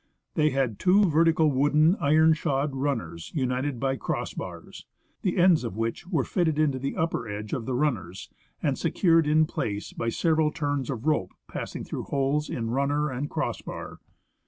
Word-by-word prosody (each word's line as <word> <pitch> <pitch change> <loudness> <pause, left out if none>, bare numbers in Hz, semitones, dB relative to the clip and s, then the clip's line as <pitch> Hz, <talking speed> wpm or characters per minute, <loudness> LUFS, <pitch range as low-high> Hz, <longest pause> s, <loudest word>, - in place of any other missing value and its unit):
They 155 0 +3
had 130 -6 -1
two 195 +3 +5
vertical 160 -1 +3
wooden, 150 +5 +4
iron 155 +2 +4
shod 145 -2 -1
runners 115 - -3
united 130 -1 -1
by 135 +1 0
cross - - -3
bars, - - -8 0.3
the 185 -2 -1
ends 175 -4 +5
of 115 -4 -5
which 115 +8 -3
were 165 -8 +1
fitted 160 -2 0
into 145 -4 +1
the 135 +2 -3
upper 160 -8 -1
edge 105 +1 -5
of 115 - -3
the 130 - -1
runners 110 - -2 0.4
and - - 0
secured 165 -3 +3
in 155 +1 +4
place 105 -8 -4
by 115 - -2
several 160 +4 +2
turns 145 -4 -2
of 125 -2 -4
rope 150 -13 +1
passing - - -5
through - - -5
holes 140 +2 0
in 115 -2 -3
runner 140 +3 0
and 135 +4 -3
cross - - -2
bar. - - -8
145 Hz, 175 wpm, -26 LUFS, 125-155 Hz, 0.4 s, two